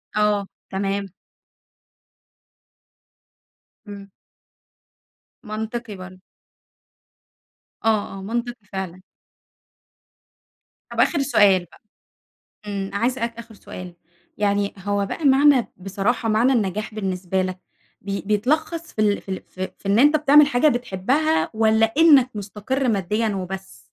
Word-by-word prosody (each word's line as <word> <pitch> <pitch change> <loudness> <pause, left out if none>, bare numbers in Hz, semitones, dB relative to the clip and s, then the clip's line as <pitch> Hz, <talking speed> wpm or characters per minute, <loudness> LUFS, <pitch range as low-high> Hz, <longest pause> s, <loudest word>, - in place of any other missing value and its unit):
آه 210 -1 +1 0.2
تمام. 195 -1 -2 2.7
امم. 200 -1 -10 1.3
منطقي 220 0 -5
برضه. 185 0 -11 1.7
آه، 215 -3 +1
آه - - -8
منطقي 235 +2 -4
فعلًا. 185 -2 -6 1.9
طب - - -5
آخر 295 - +3
سؤال 200 -9 +4
بقى 160 - -21 0.9
امم، 195 -1 -3
عايزة 240 +5 -1
أسألك 230 0 -3
آخر 230 -1 -11
سؤال، 185 -4 -10 0.4
يعني 200 -1 0
هو 200 +1 -1
بقى 300 +10 -5
معنى 275 -2 +5
بصراحة 200 +5 -1
معنى 230 +5 +3
النجاح 215 -2 -1
بالنسبة 190 -2 -2
لك 185 0 -4 0.4
بي 200 0 -4
بيتلخص 305 - -1
في 215 - -2
ال 205 -1 +2
في - - -15
ال 190 - -4
في 185 0 -4
في 195 - -9
إن 205 +3 +4
أنتَ 295 +3 +6
بتعمل 295 0 +6
حاجة 285 +1 +3
بتحبها 250 +6 +1
والّا 220 0 +3
إنك 290 -6 +6
مستقر 210 +6 -3
ماديًا 210 +2 0
وبس؟ 190 - -6
210 Hz, 115 wpm, -22 LUFS, 195-245 Hz, 2.7 s, أنتَ